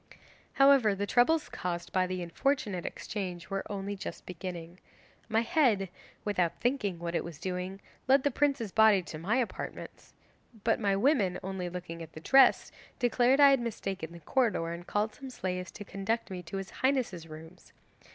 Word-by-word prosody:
'However, 275 -7 +5
the 200 +1 -2
troubles 300 +9 +3
caused 175 -1 -4
by 185 -1 +2
the 185 -1 -3
unfortunate 195 0 -1
exchange 185 -3 -5
were 195 0 -1
only 200 0 -3
just 195 - -7
beginning. 175 -1 -7 0.5
My 220 0 +3
head, 230 - +2 0.4
without 185 -5 0
thinking 240 -8 0
what 170 0 -4
it - - 0
was 170 -3 -8
doing, 185 +2 -4 0.3
led 265 +1 +5
the 285 - +2
prince's 270 -6 0
body 220 -3 +5
to 155 -2 -8
my 195 +8 0
apartments. 255 -3 -5 0.5
But 225 - +2
my 200 -3 +2
women, 200 - +2
only 190 -1 -3
looking 175 -2 -7
at 160 -1 -9
the - - -8
dress, 265 +9 +5 0.3
declared 245 +2 +3
I 280 -1 +9
had 270 - +4
mistaken 195 -7 -4
the 170 - -10
corridor, 210 - +1
and 175 +1 -9
called 210 +1 0
some 270 -2 -9
slaves 180 -6 -4
to 205 - -8
conduct 195 +3 -2
me 180 -1 -5
to 175 +3 -6
his 195 -1 -6
highness's 250 -11 0
rooms. 160 +3 -12
195 Hz, 170 wpm, -30 LUFS, 180-240 Hz, 0.5 s, I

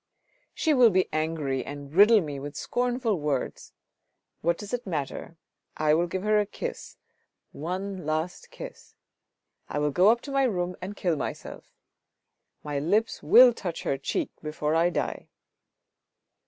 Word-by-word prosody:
" - - -39
She 315 - +2
will 250 -4 +7
be 185 -2 +2
angry 155 -4 -1
and 145 +1 -8
riddle 210 +4 +7
me 145 -4 -5
with 145 +1 -7
scornful 245 -5 -1
words! 145 -3 -3 0.7
What 170 +1 +1
does 205 +3 -8
it 245 -3 -3
matter? 160 0 -4 0.4
I 155 0 +3
will 170 +3 +2
give 185 +2 -4
her 210 0 +3
a 205 - 0
kiss, - - -6 0.5
one 185 +4 -4
last 155 +3 -3
kiss. - - -11 0.7
I - - -3
will 150 0 +1
go 180 +8 +5
up 235 +1 +3
to 280 - -8
my 275 -1 +3
room 180 -6 -1
and 195 +3 -6
kill 175 -4 0
myself... - - -7 0.9
my 145 -1 -2
lips 205 +10 0
will 250 0 +8
touch 180 -7 -5
her - - 0
cheek - - -2
before 155 0 -2
I 165 +2 +3
die." - - -3
175 Hz, 155 wpm, -27 LUFS, 150-210 Hz, 0.9 s, will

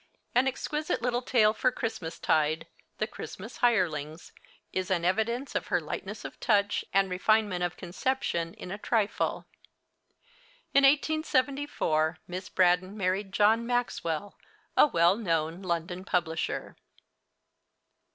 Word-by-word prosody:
An 250 +2 +4
exquisite 300 0 -2
little 245 0 +1
tale 220 -4 +3
for 255 - +1
Christmas 185 -9 -4
tide, 155 +1 +1 0.3
'The 215 - 0
Christmas 220 0 -9
Hirelings,' 165 -9 0 0.4
is 185 -1 -2
an 175 -3 +1
evidence 230 +8 0
of - - -2
her - - +2
lightness - - -6
of - - -8
touch 205 -3 +2
and 195 0 +3
refinement 185 0 +1
of 175 0 -2
conception 180 -3 -2
in 180 - -8
a 205 - -5
trifle. 215 -1 0 1.3
In 275 0 +6
1874 280 - +1
Miss 185 +1 -6
Braddon 185 +2 +2
married 195 +1 -1
John 220 +4 +3
Maxwell, 205 -7 -2 0.4
a - - +7
well 170 - +4
known 165 -4 -1
London 175 0 -3
publisher. 175 -4 -2
195 Hz, 120 wpm, -29 LUFS, 175-235 Hz, 1.3 s, a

